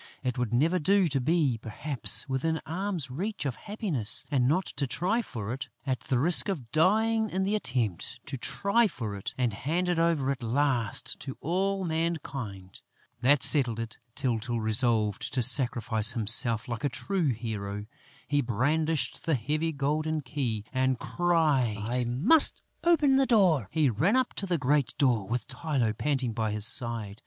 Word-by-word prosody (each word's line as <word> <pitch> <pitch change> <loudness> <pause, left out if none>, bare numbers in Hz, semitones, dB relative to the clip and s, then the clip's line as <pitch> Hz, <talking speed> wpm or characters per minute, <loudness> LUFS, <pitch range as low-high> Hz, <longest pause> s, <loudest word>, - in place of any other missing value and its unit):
It 125 -2 -2
would 125 -4 -2
never 160 +9 +2
do 195 +3 +2
to 135 -2 -1
be, 145 -4 +1
perhaps, 125 +5 -2
within 155 +5 -1
arm's 170 -4 -3
length 195 +7 -4
of 130 -4 -2
happiness 195 - +3
and 130 -3 +2
not 180 +6 +1
to 140 - -1
try 195 - -1
for 110 - -6
it, 135 0 -7 0.2
at 130 -2 -1
the 130 - -2
risk 165 +9 +4
of 135 -12 -5
dying 220 +6 +2
in 190 +1 -2
the 200 +2 -1
attempt, 125 - -2
to 140 - -6
try 200 - +1
for 110 - -6
it 100 - -6
and 125 -4 0
hand 165 - -2
it 175 -2 0
over 165 -5 +1
at 135 -1 -5
last 120 -1 -1
to 135 - -7
all 190 +4 -1
mankind! 140 - -4 0.4
That 140 +4 +3
settled 125 -7 +4
it! 115 -1 -7 0.2
Tyltyl 120 -3 -2
resolved 110 -1 +2
to 125 - +1
sacrifice 120 -3 +2
himself. 115 -1 +5
Like 120 +2 -5
a 145 - +1
true 185 +5 -2
hero, 105 -4 -4 0.4
he 145 -1 +1
brandished 145 +6 -1
the 160 - +2
heavy 150 +7 -2
golden 155 +2 -2
key 120 -6 -3
and 130 0 +1
cried: 135 -11 0
"I 125 -1 +1
must 170 - +2 0.2
open 300 -6 +3
the 270 -1 +2
door!" 180 - +3
He 150 -5 +1
ran 160 - +1
up 260 -1 0
to 195 - -3
the 175 -2 0
great 140 -1 0
door, 120 -8 +1
with 120 +1 -3
Tylô 130 -9 -2
panting 135 -5 -1
by 110 -1 -2
his 105 -1 0
side. 115 -3 +1
135 Hz, 170 wpm, -28 LUFS, 115-165 Hz, 0.4 s, himself